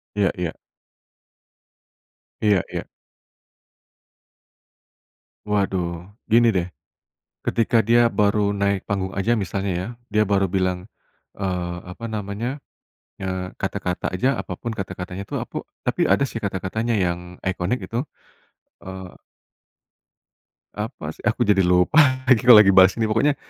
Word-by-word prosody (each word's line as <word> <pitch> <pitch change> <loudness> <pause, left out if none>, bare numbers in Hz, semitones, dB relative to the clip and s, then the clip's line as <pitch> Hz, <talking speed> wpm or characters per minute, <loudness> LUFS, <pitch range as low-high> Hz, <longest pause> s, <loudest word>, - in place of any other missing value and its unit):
iya 100 -3 +2
iya. 90 -2 -2 1.9
Iya 105 -4 +3
iya. - - -3 2.7
Waduh, 90 -4 -1 0.2
gini 115 0 +5
deh, 90 -2 0 0.8
ketika 115 -1 +2
dia 120 +1 +5
baru 105 -2 +1
naik 100 -1 0
panggung 95 -2 -2
aja 115 +5 +1
misalnya 95 0 -2
ya, 90 +2 -3 0.2
dia 105 0 +2
baru 100 -1 +1
bilang, 95 0 -1 0.5
eee, 90 -3 -2 0.2
apa 115 - -10
namanya, 105 +2 -4 0.7
eee, 95 -1 -4
kata-kata 90 -1 -2
aja 110 +9 +1
apapun 120 - -5
kata-katanya 95 -2 -6
tuh - - -3
aku - - -8 0.3
tapi - - +1
ada 140 - +3
sih 120 -4 -3
kata-katanya 105 +3 -2
yang, 85 -1 -1 0.2
iconic 95 +5 -1
gitu, 120 +6 -3 0.8
eee 95 -1 -9 1.6
apa 105 - -5
sih, - - -17
aku 120 - +2
jadi 105 -3 +3
lupa 90 - +4 0.2
lagi 130 -4 +4
kalau 120 - +11
lagi 95 - +5
bahas 95 0 +6
ini 115 - -1
pokoknya, 115 +7 +2
100 Hz, 120 wpm, -22 LUFS, 95-110 Hz, 2.7 s, kalau